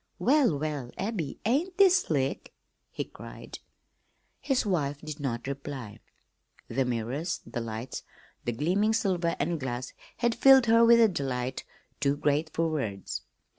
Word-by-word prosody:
"Well, 265 - +3
well, 145 -4 -3
Abby, 190 -8 -3
ain't 315 - +1
this 385 -2 +7
slick?" 140 - -2 0.3
he - - -4
cried. - - -10 0.8
His 270 -5 0
wife 150 -8 0
did 155 0 -7
not 120 -5 -3
reply. 135 -5 -6 0.7
The 130 +3 0
mirrors, 125 +8 -2
the 120 - -4
lights, 115 +2 -5 0.4
the 120 - -1
gleaming 185 - +1
silver 180 -6 +1
and 165 +2 -1
glass 130 -1 -4 0.2
had 235 -1 +1
filled 265 +1 +7
her 230 0 +5
with 235 0 +7
a 230 - +7
delight 130 -7 -3 0.3
too 140 0 +1
great 150 +2 +1
for 165 0 0
words. 105 - -3
150 Hz, 140 wpm, -28 LUFS, 130-220 Hz, 0.8 s, this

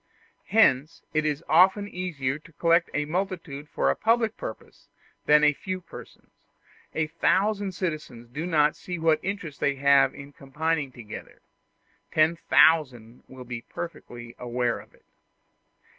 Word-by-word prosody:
Hence 155 -9 +3
it 155 0 +1
is 150 +1 -2
often 195 +2 +4
easier 155 -8 -3
to 160 +1 -19
collect 170 +2 +2
a 150 - -1
multitude 165 -4 -4
for 70 - +1
a - - -2
public 225 -1 +1
purpose - - -9 0.4
than 150 0 +6
a 150 0 +5
few 185 +5 -5
persons; 180 - -13 0.6
a 160 - +1
thousand 200 +5 0
citizens 155 -10 -5
do 150 +7 -4
not 150 -3 +3
see 180 -1 -6
what 160 -1 +2
interest 180 -6 -5
they 140 - +1
have 140 0 +4
in 140 0 -11
combining 150 0 -2
together 115 -4 -11 0.7
ten 155 +2 +3
thousand 130 -9 +3
will 130 -1 -11
be 120 -1 -6
perfectly 120 -7 -8
aware 120 -1 -1
of - - -17
it. - - -29
155 Hz, 145 wpm, -26 LUFS, 135-180 Hz, 0.7 s, than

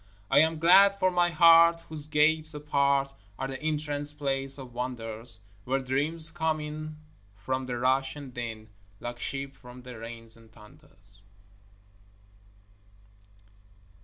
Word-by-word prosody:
I - - +6
am 160 +1 +3
glad 195 +5 +6
for 185 -1 +2
my 175 -1 +2
heart 165 0 +6
whose 155 -3 -7
gates 155 +1 +3
apart 140 -2 +1 0.2
Are 135 - -3
the 135 +2 -7
entrance 150 -1 -2
place 135 -2 -2
of 130 -3 -10
wonders, 115 -3 -2 0.2
Where 135 +4 0
dreams 150 +5 +1
come 160 -2 -1
in 155 0 -7 0.4
from 130 +4 -3
the 125 -1 -3
rush 130 +2 +1
and 140 -4 -10
din 115 -3 -6 0.3
Like 120 0 -6
sheep 135 0 -5
from 125 0 -13
the 125 -2 -10
rains 115 0 -7
and 115 -1 -18
thunders. 105 -4 -17
140 Hz, 130 wpm, -28 LUFS, 125-155 Hz, 0.4 s, I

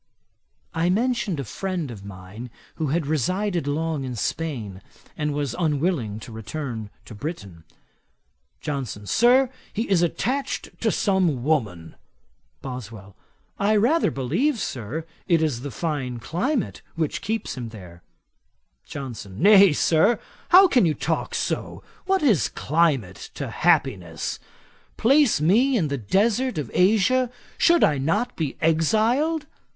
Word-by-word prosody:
I 165 +1 +1
mentioned 220 - 0
a - - -2
friend 175 - -4
of 100 -4 -10
mine 100 +4 -9 0.3
who 160 - -1
had 155 +3 0
resided 175 - -1
long 155 0 -1
in 125 -2 -4
Spain, 115 - -3 0.3
and 150 -1 -1
was 145 -4 -2
unwilling 150 - 0
to 120 - -10
return 110 0 -5 0.2
to - - -10
Britain. 100 - -7 1.0
JOHNSON. 130 -8 -4
'Sir, 245 - +4 0.2
he 225 +3 -2
is 190 -3 +3
attached 255 - -1
to - - +2
some 180 - +1
woman.' 105 - -1 0.7
BOSWELL. 110 -7 -8 0.4
'I 205 +2 +3
rather 245 +11 +3
believe, 185 - 0
Sir, 135 - -4 0.2
it 165 -3 +3
is 135 -7 -1
the 140 - -5
fine 135 -2 -3
climate 195 - -2
which 165 +2 -2
keeps 220 +2 -3
him 120 -3 -6
there.' 90 -6 -12 0.9
JOHNSON. 115 -9 -7
'Nay, 200 +1 +7
Sir, 165 +9 +3 0.3
how 370 +2 +8
can 255 - +3
you 155 - 0
talk 155 +5 -2
so? - - -3 0.2
What 385 -3 +2
is 220 - +3
climate 140 - 0
to - - -5
happiness? 85 -5 0 0.6
Place 270 - +4
me 235 - +3
in 160 -8 0
the 140 -5 -3 0.4
heart 260 -5 -2
of 145 -7 -4
Asia, 220 +6 +3 0.3
should 340 0 +5
I 145 -3 +3
not 205 - 0
be 155 -5 -3
exiled? 225 - +2
155 Hz, 135 wpm, -24 LUFS, 125-205 Hz, 1.0 s, how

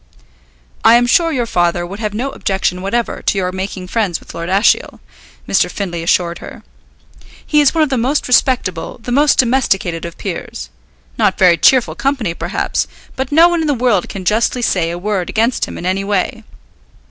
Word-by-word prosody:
"I 225 - +7
am 240 0 +4
sure 330 +7 +3
your 250 -5 -1
father 175 -4 0
would 195 +4 -8
have 210 -2 -3
no 260 +5 -2
objection 190 -2 -2
whatever 230 +5 -2
to - - 0
your 180 -1 -1
making 190 0 -5
friends 195 -5 -1
with - - -13
Lord 170 +1 -5
Ashiel," 195 +4 +2 0.5
Mr. - - +2
Findlay 175 -4 -4
assured 170 0 0
her. - - -11 0.8
"He 300 -1 +3
is 290 +2 +3
one 320 - +4
of 295 - -1
the 260 - +1
most 270 +6 0
respectable, 245 -10 +1
the 245 - -5
most 290 +3 +3
domesticated 215 -9 +1
of 170 -1 -7
peers. 60 0 -6 0.5
Not - - +2
very 180 -2 +5
cheerful 255 +7 +3
company, 265 -10 -1
perhaps, - - -2 0.3
but 265 +1 -3
no 325 +3 +6
one 345 -1 0
in 315 - -1
the 290 - +1
world 235 -6 +1
can 190 -2 -7
justly 230 +5 +1
say 175 -7 +1
a 170 - -4
word 190 -1 -2
against 230 +3 +1
him - - -9
in - - -7
any 190 +2 0
way. 205 +3 -2
210 Hz, 190 wpm, -16 LUFS, 180-255 Hz, 0.8 s, I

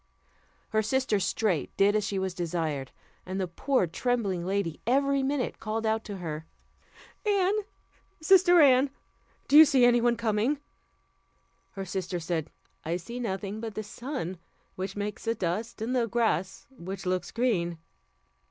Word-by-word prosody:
Her 215 - +2
sister 225 -1 +1
straight 190 -2 -1
did 200 +1 +4
as 215 - +2
she 195 - -2
was 190 -1 -1
desired; 160 -6 -2 0.3
and 185 +1 -4
the 185 - -1
poor 225 +6 +1
trembling 200 -1 -1
lady 190 -3 -2
every 275 +2 +3
minute 270 -1 -1
cried 220 +1 -3
out 220 0 +1
to 205 -2 -6
her: 160 -3 -5 0.8
"Anne! 400 -2 +2 0.7
sister 355 +1 +6
Anne! 270 -1 +6 0.6
do 280 - +2
you 310 - +12
see 275 -5 +4
any 240 0 +5
one 240 0 +2
coming?" 230 +5 +1 1.2
Her 195 -2 -5
sister 185 -1 -3
said, 165 -2 -2 0.3
"I 165 +2 -1
see 235 +8 -7
nothing 200 -2 -3
but 225 -2 -5
the 215 - -3
sun, 210 - -5 0.3
which 190 +1 -5
makes 210 +2 -5
a 230 - +1
dust, 215 +5 -3
and 250 +3 -1
the 240 -2 +2
grass, 200 -6 0
which 190 -1 -7
looks 180 -1 -1
green." 185 -9 0
210 Hz, 150 wpm, -28 LUFS, 185-245 Hz, 1.2 s, you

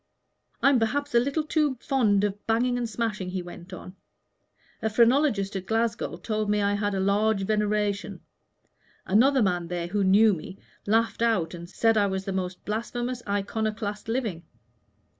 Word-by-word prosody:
"I'm 275 -2 +5
perhaps 285 +6 -1
a 235 - +6
little 280 +5 0
too 300 -3 +1
fond 215 -8 +2
of 205 0 -3
banging 240 +2 +2
and 240 -2 -2
smashing," 210 -4 -3
he 185 -1 -3
went 175 +1 -11
on: 185 0 -9 0.9
"a 220 - 0
phrenologist 230 -3 +2
at 190 -1 -4
Glasgow 225 -6 -1
told 215 +3 -2
me 210 0 +2
I 200 0 +1
had 205 0 -1
large 200 +2 +1
veneration; 210 0 -1 0.8
another 255 +6 +4
man 175 -3 0
there, 175 0 -3
who 200 +3 -1
knew 205 +3 +5
me, 185 +3 -7 0.3
laughed 225 +2 +1
out 190 -8 +1
and 170 0 -8
said 225 +3 +2
I 205 -1 +3
was 190 0 -3
the 195 - -3
most 185 -1 -4
blasphemous 240 +3 -3
iconoclast 210 +1 -2
living. 225 -8 -2
210 Hz, 160 wpm, -26 LUFS, 195-230 Hz, 0.9 s, a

